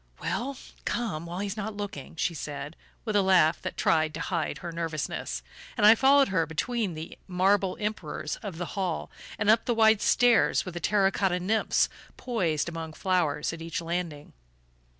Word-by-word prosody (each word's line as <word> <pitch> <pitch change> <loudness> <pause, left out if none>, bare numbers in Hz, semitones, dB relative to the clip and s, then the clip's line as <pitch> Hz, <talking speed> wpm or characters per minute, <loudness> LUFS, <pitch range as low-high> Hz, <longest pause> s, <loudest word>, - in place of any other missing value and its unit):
"Well, 265 +2 -3 0.3
come 170 -9 -2
while 175 +1 -5
he's 200 0 -3
not 210 -1 -5
looking," 195 -9 -6
she 170 +2 0
said, 145 0 -6 0.3
with 215 -2 -2
a 205 - +5
laugh 180 -4 +4
that - - -5
tried 155 -1 +2
to - - -5
hide 165 +1 -2
her 175 -2 -6
nervousness; 155 - -3 0.3
and - - +4
I 215 - +10
followed 270 +2 +5
her 165 -4 +1
between 200 +3 -2
the 160 +2 -8
marble 190 +1 +2
Emperors 195 -8 -3
of 195 -6 -7
the 175 0 -5
hall, 185 -5 -2 0.3
and 205 - -1
up 220 +2 +5
the 240 - +1
wide 220 -2 +5
stairs 245 -2 +4
with 175 -2 -6
terra 195 +1 +3
cotta 185 -3 0
nymphs 215 +5 +2 0.3
poised 175 - -1
among 165 -2 -5
flowers 165 -5 0
at 165 - -8
each 165 +2 -3
landing. 170 -3 -4
180 Hz, 170 wpm, -28 LUFS, 165-210 Hz, 0.3 s, I